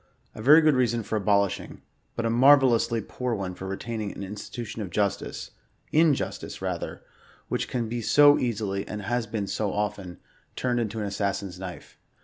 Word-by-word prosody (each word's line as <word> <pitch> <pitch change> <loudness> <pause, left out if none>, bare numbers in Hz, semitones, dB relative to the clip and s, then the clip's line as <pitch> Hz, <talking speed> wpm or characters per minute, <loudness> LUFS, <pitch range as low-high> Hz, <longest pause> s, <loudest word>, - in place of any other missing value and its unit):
A - - -9
very 150 +7 +7
good 155 -1 +4
reason 120 -3 +1
for 105 - -3
abolishing, 100 -1 0 0.3
but 115 - -2
a - - +1
maTvelloXisly 125 -2 +5
p'oor 125 0 -3
one 95 -2 -4
for 95 +1 -7
retaining 105 +1 -4
"an - - -7
in 95 +1 -6
«titution 110 +1 -6
of 100 - -4
justice" 100 +2 -2 0.4
(injustice, 155 -3 +1
rather,) - - -4 0.5
which - - -1
can 120 -3 -2
be 120 +1 -3
so 145 +5 +6
easily, 105 -5 -1
and 105 0 -5
has 120 +2 -1
been 105 -2 -3
so 100 +1 -2
often, 100 -3 -3 0.4
turned 125 -1 0
into 110 -1 -2
"an - - -2
assassin's 100 -2 -3
knife." 95 -2 -9
110 Hz, 170 wpm, -26 LUFS, 100-120 Hz, 0.5 s, very